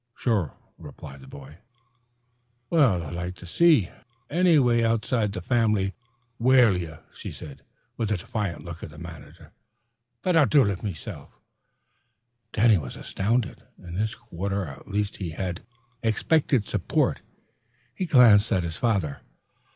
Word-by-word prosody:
"Sure," 105 - 0 0.2
replied 70 0 -11
the 65 - -14
boy. 70 +4 -12 1.1
"Well, 125 - +4
I'd 75 - -7
like 90 +1 -4
to 90 - -12
see 145 - +4 0.4
anny 175 0 +4
wan 120 -4 +4
outside 115 -1 +1
the 95 -3 -6
fam'ly 105 -4 +1 0.5
whale 120 -4 +5
ye," 85 -3 -4 0.2
she - - -8
said, 70 -3 -10 0.4
with 110 -2 -1
a 105 - +2
defiant 95 0 -4
look 85 -1 -8
at - - -7
the 75 - -14
manager, 85 -1 -11 0.7
"but 180 -2 +2
I'll 155 -4 +6
do 145 -3 +5
it 100 -3 -2
mesilf." 95 -8 -7 1.2
Danny 110 -3 +4
was 65 -5 -7
astounded. 115 +4 -1 0.2
In 90 -2 -11
this 110 +4 -1
quarter 100 -2 -4
at 70 -4 -11
least 105 0 -2
he 90 -4 -4
had 85 +1 -4 0.4
expected 120 +1 +2
support. - - 0 0.7
He 185 - -3
glanced 115 -7 +6
at 90 - +2
his 80 -1 -4
father. 100 - 0
100 Hz, 145 wpm, -26 LUFS, 85-120 Hz, 1.2 s, I'll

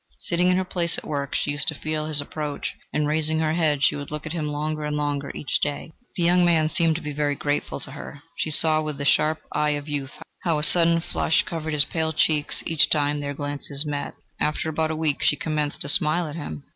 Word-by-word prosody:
Sitting 175 +1 0
in 180 - +3
her 190 - -1
place 170 -2 0
at - - -7
work, 140 -2 -3
she 145 - 0
used 145 0 0
to 155 - 0
feel 155 +1 -3
his 155 -2 -1
approach; 145 0 -4 0.2
and 150 - 0
raising 155 +1 +1
her 160 -1 0
head, 155 -4 +1
she - - +4
would 145 -1 -7
look 150 +1 -6
at 155 - -4
him 155 -3 -3
longer 150 +1 -3
and 150 0 -2
longer 145 -1 -2
each 145 - -2
day. 145 +2 -3 0.2
The 175 - -1
young 175 +1 +4
man 160 -3 +3
seemed 165 -1 +3
to 165 - -5
be 150 -1 -4
very 145 0 0
grateful 145 +1 -2
to 135 - -8
her: 145 0 -10
she - - -2
saw 155 0 +5
with 150 -2 -4
the 140 - -4
sharp 155 +2 +2
eye 150 0 0
of 145 +1 -9
youth, 145 -2 -4 0.3
how 165 -3 0
a 150 - -3
sudden 170 0 +6
flush 160 - +1
covered 160 -2 -5
his 145 -2 +4
pale 160 +1 -2
cheeks 150 -1 +2
each 160 -3 +3
time 145 -1 +1
that 145 - -4
their 140 - -4
glances 145 0 -2
met. 145 -1 -4 0.2
After 150 +1 -1
about 160 0 -1
a 160 - -2
week 155 -2 -1
she - - +3
commenced 150 0 -2
to 145 - 0
smile 165 +3 +4
at 150 -1 -7
him... 80 - -7
150 Hz, 245 wpm, -24 LUFS, 145-160 Hz, 0.3 s, sudden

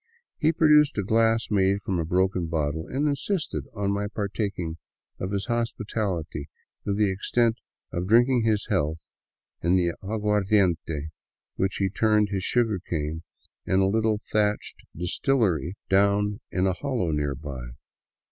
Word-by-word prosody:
He 155 - +4
produced 150 -4 +4
a 105 - +1
glass 115 +2 +2
made 100 0 +2
from 95 -3 -1
a 80 - -1
broken 90 0 +1
bottle 80 0 -2
and 145 +3 0
insisted 155 +4 -2
on 100 -1 0
my 100 +1 -1
partaking 100 -5 -3 0.4
of 90 - -3
his 100 -1 -2
hos 120 +1 -1
pitality 90 -9 -3 0.4
to 100 - 0
the 105 -1 +2
extent 115 +4 +1 0.4
of 90 +1 -2
drinking 120 +3 +5
his 110 -2 +1
health 80 -7 -1 0.5
in 85 +2 +3
the 85 -2 +2
aguardiente 105 -3 +2
into 75 -2 -3 0.5
which 95 +1 0
he 100 - +1
turned 105 +1 +2
his 95 -2 -2
sugar 115 -4 +1
cane 80 -2 -3 0.5
in 95 - +3
a 95 - +4
little 110 +1 +1
thatched 105 -1 0
distillery 90 - 0
down 100 +2 +2
in 95 0 0
a 95 - +2
hollow 120 - -1
nearby. 75 -2 -3
100 Hz, 145 wpm, -26 LUFS, 90-110 Hz, 0.5 s, drinking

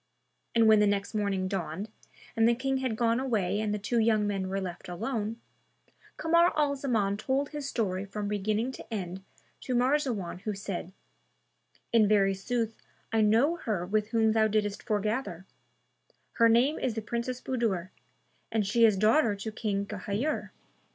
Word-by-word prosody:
And 230 -1 +5
when 215 -1 +7
the 210 - +4
next 200 +1 -1
morning 200 -3 0
dawned, 185 0 -3 0.5
and 225 0 +4
the 235 - +3
King 270 +2 -1
had 260 -4 -1
gone 230 +1 +2
away 210 -7 0
and 215 -1 -1
the 210 - 0
two 220 +4 0
young 220 -2 +3
men 195 -2 -2
were 195 +1 -1
left 180 -2 -6
alone, 220 +3 -3 0.8
Kamar 335 +2 +4
al 290 -2 +2
Zaman 220 -8 0
told 265 +6 -1
his 295 -2 -5
story 190 -7 -1
from 205 +1 -5
beginning 210 +4 -1
to 260 - -11
end 190 -3 -4 0.4
to 255 - -3
Marzawan 245 - 0
who 210 +1 -4
said, 195 -2 -5 1.0
"In 220 -2 +5
very 200 -2 +3
sooth 225 +3 -2 0.4
I 225 - +3
know 230 +11 +3
her 205 - -2
with 210 +2 0
whom 225 -1 +2
thou 220 0 +3
didst 210 -1 -1
foregather; 210 -4 -2 0.9
her 230 0 +4
name 245 +7 +3
is 240 -4 -1
the 225 - -3
Princess 235 +3 -3
Budur 220 -10 -1 0.6
and 220 -2 +1
she 230 +4 +4
is 215 -3 +4
daughter 215 +2 +3
to 200 +2 -5
King 205 -2 -2
Ghayur." 210 +8 -3
215 Hz, 165 wpm, -29 LUFS, 200-235 Hz, 1.0 s, when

